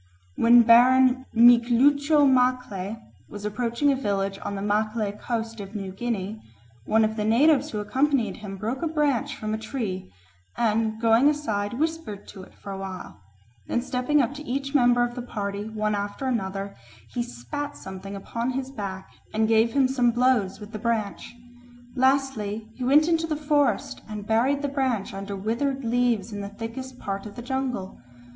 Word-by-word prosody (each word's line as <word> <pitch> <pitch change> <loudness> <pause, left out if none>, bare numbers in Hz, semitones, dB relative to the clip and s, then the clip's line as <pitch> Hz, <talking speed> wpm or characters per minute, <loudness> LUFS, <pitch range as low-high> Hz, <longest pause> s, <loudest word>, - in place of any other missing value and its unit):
When 235 +1 +6
Baron 255 +2 +5
Miklucho 255 +6 +5
Maclay 250 -6 +1 0.3
was 205 0 -8
approaching 235 +6 0
a - - +2
village 195 -5 -2
on 200 - -4
the 195 - -4
Maclay 215 0 0
Coast 225 +1 -4
of 200 +1 -8
New 195 -2 -4
Guinea, 215 0 -4 0.4
one 220 +6 +3
of 215 0 -2
the 210 - -1
natives 265 +7 +4
who 215 - -5
accompanied 265 +3 0
him 195 -2 -7
broke 225 +6 -3
a 335 - 0
branch 295 -6 0
from 215 0 -4
a 220 - -2
tree 220 - -4 0.5
and 220 -1 +1
going 230 +5 +5
aside 215 -9 -2
whispered 305 -7 -3
to 195 - -10
it 185 - -15
for 200 - -9
a 195 - -5
while; 185 - -8 0.5
then 240 - -1
stepping 260 +3 +1
up 240 - -2
to 290 - -8
each 275 0 -3
member 245 -3 +4
of 240 0 -2
the 245 - -5
party, 205 -3 -4
one 215 -1 -1
after 205 +5 -3
another, 200 -5 -2 0.4
he 245 - -1
spat 235 - -6
something 190 +1 -8
upon 230 +5 -3
his 265 0 -4
back 195 -6 -6 0.3
and 220 0 +2
gave 225 +1 +3
him 275 -2 +4
some 255 -2 +2
blows 240 -5 +2
with 210 0 -10
the 215 - -6
branch. 225 0 -2 0.6
Lastly, 250 -5 0
he 255 - -7
went 290 +5 +5
into 330 -1 +1
the 310 - -1
forest 290 -2 0
and 210 -1 -6
buried 255 +6 +1
the - - +1
branch 260 -8 -1
under 195 +1 -5
withered 245 +7 -2
leaves 235 -2 +1
in 205 - -4
the 200 - -5
thickest 230 +5 -7
part 195 -1 -5
of 205 - -11
the 240 - -7
jungle. 250 -6 -3
230 Hz, 175 wpm, -25 LUFS, 205-260 Hz, 0.6 s, When